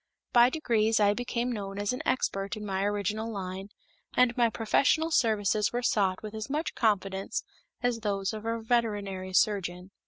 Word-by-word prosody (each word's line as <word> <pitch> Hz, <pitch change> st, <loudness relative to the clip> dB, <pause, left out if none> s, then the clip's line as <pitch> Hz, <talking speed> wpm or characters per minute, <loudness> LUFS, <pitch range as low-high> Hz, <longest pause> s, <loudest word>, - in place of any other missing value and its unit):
By 240 Hz, 0 st, +7 dB
degrees, 225 Hz, -7 st, +1 dB
I 205 Hz, -1 st, +4 dB
became 245 Hz, +1 st, -2 dB
known 200 Hz, -3 st, -5 dB
as 205 Hz, +3 st, -1 dB
an 250 Hz, -, -4 dB
expert 195 Hz, -4 st, -1 dB
in 210 Hz, -, -6 dB
my 195 Hz, -1 st, -1 dB
original 205 Hz, +2 st, -1 dB
line, 190 Hz, -1 st, -5 dB, 0.5 s
and 250 Hz, -1 st, +4 dB
my 235 Hz, -2 st, +3 dB
professional 280 Hz, +9 st, +2 dB
services 215 Hz, -, +2 dB
were 245 Hz, +1 st, -2 dB
sought 195 Hz, -4 st, +1 dB
with 215 Hz, 0 st, -6 dB
as 220 Hz, +2 st, -5 dB
much 305 Hz, +4 st, -2 dB
confidence 195 Hz, -3 st, 0 dB, 0.4 s
as 245 Hz, -2 st, +1 dB
those 200 Hz, -2 st, -1 dB
of 215 Hz, -1 st, -6 dB
a 230 Hz, 0 st, -2 dB
veterinary 205 Hz, -5 st, -1 dB
surgeon. 185 Hz, -2 st, +1 dB
215 Hz, 165 wpm, -29 LUFS, 195-235 Hz, 0.5 s, By